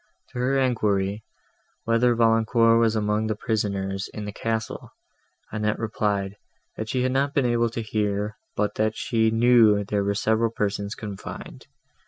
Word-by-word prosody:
To 125 - -7
her 130 +2 +1
enquiry, 105 -5 0 0.6
whether 115 +1 +3
Valancourt 115 0 +4
was 115 -1 +2
among 105 0 0
the 110 - -1
prisoners 100 -3 -2
in 105 - -5
the 105 - -5
castle, 110 +1 -4 0.6
Annette 105 0 -1
replied, 105 -3 -2 0.4
that 110 0 -5
she 125 +1 0
had 130 - +1
not 140 +2 0
been 140 - +2
able 120 -1 +2
to 115 0 -4
hear, 105 0 -1 0.2
but 105 0 0
that 110 0 +1
she 115 -3 +1
knew 115 -2 +5
there 100 0 -1
were 100 0 0
several 110 +2 +1
persons 105 -1 -2
confined. 100 -3 -8
110 Hz, 155 wpm, -24 LUFS, 105-115 Hz, 0.6 s, knew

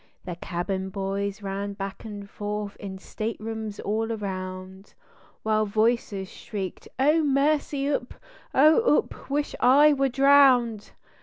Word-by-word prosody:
The 175 - -5
cabin 190 +2 -3
boys 200 +1 -3
ran 200 +1 -3
back 195 +2 -7
and 205 -2 -7
forth 205 0 -5
in 190 -1 -7
staterooms 220 +1 -5
all 225 +2 -1
around, 190 -2 -6 0.5
While 215 0 +1
voices 215 -2 0
shrieked: 190 -2 -7
"Oh, 300 +5 +4
mercy 285 0 +1
oop! 280 -3 -2 0.4
Oh 315 - +5
oop! - - -4
wish 290 +1 -1
I 285 +4 +6
were 275 -1 +1
drowned." 260 -5 +4
215 Hz, 125 wpm, -26 LUFS, 195-270 Hz, 0.5 s, I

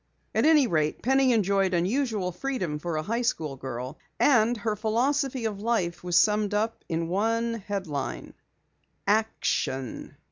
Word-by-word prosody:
At - - +2
any 310 -3 +6
rate, 155 -7 0
Penny 265 +1 +4
enjoyed 195 -4 +2
unusual 205 +1 0
freedom 180 - -3
for 170 0 -3
a 155 - -1
high 230 +7 -1
school 155 - -1
girl, 130 +1 -6 0.2
and 240 -3 +4
her 215 0 -1
philosophy 250 +4 0
of 205 -2 -3
life 205 -8 -1
was 175 -1 -1
summed 210 -1 +3
up 220 +2 -1
in 165 0 -1
one 230 +5 0
headline: 185 -9 -4 0.7
ACTION. 200 - -1
210 Hz, 140 wpm, -27 LUFS, 170-235 Hz, 0.7 s, any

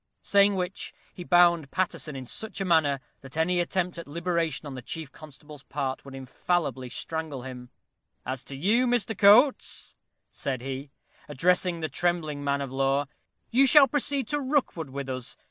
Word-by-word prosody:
Saying 200 0 +4
which, 180 0 -4 0.2
he 180 - -8
bound 175 -4 +4
Paterson 170 -4 -2
in 130 -1 -6
such 220 - -4
a 195 - -1
manner, 155 -6 +3 0.2
that 135 +3 -11
any 175 +2 +2
attempt 175 0 -1
at 170 - -8
liberation 165 -2 -2
on 145 - -6
the 130 - -7
chief 155 +2 -6
constable's 150 -1 -13
part 135 -1 -4
would 135 -1 -10
infallibly 135 0 -2
strangle 155 -1 -5
him. 125 -1 -8 0.6
"As 130 0 -4
to 140 - -7
you, 215 - +2
Mr. 240 -2 0
Coates," 220 +8 +4 0.4
said 130 -3 -4
he, 135 +2 -5 0.4
addressing 180 +2 +1
the 155 - -1
trembling 155 -1 -1
man 140 0 0
of 135 -2 -5
law, 135 +1 +1 0.5
"you 270 +3 +5
shall 280 +1 +8
proceed 280 -2 0
to 295 0 0
Rookwood 260 - -1
with 140 0 -5
us. 130 -2 -6
160 Hz, 165 wpm, -27 LUFS, 135-185 Hz, 0.6 s, shall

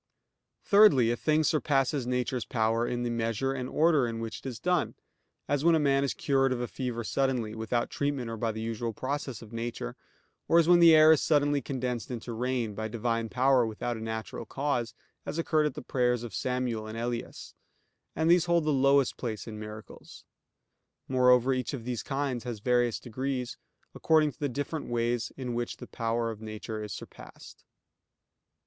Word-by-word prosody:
Thirdly, 200 - +6
a - - +1
thing 155 +5 +1
surpasses 140 -4 +1
nature's 125 -1 -1
power 115 +1 0
in 120 0 -2
the 120 - -1
measure 115 +3 -1
and 130 -1 -4
order 155 -5 +3
in 115 -1 -4
which 115 -1 -5
it - - -22
is 120 -4 -6
done; 180 +4 0 0.5
as 145 0 0
when 170 0 +5
a - - +3
man 140 -2 +2
is 140 - -1
cured 135 -2 +1
of 130 - -1
a 120 - -2
fever 120 -2 -4
suddenly, 125 -3 -1
without 110 +2 -2
treatment 140 -4 -2
or 115 0 -2
the 110 - -7
usual 115 0 -3
process 130 0 -4
of 115 0 -14
nature; 115 - -4 0.5
or 165 - +4
as 165 -1 +5
when 175 0 +6
the 165 -2 +8
air 155 0 +8
is 155 - +4
suddenly 145 -2 +2
condensed 125 -3 -3
into 120 -1 -5
rain, 120 -2 -1
by 110 +2 -4
Divine 115 0 -2
power 130 +1 +3
without 115 +2 -3
a - - -7
natural 110 0 -5
cause, 135 -4 -2 0.3
as - - -5
occurred 155 -2 +2
at 140 - -5
the 150 - -7
prayers 125 -2 0
of 115 -4 -7
Samuel 125 -2 -2
and 110 +1 -7
Elias; 120 0 -5 0.6
and 160 +1 0
these 175 0 +5
hold 170 -1 +2
the 155 - +2
lowest 140 0 +3
place 110 -4 -4
in 110 -2 -7
miracles. 105 0 -10 0.8
Moreover, 125 0 +4
each 130 +2 -2
of 115 -4 -9
these 125 -2 -3
kinds 135 -4 -2
has 120 -3 -5
various 120 +1 +1
degrees, 130 +1 -4 0.4
according 155 -2 +3
to 120 - -26
the 145 - -1
different 145 +4 -4
ways 120 +1 -1
in 125 -2 -4
which 120 0 -3
the - - -9
power 115 0 -2
of 110 -1 -10
nature 110 0 -6
is 105 - -7
surpassed. - - -11
125 Hz, 185 wpm, -29 LUFS, 115-140 Hz, 0.8 s, the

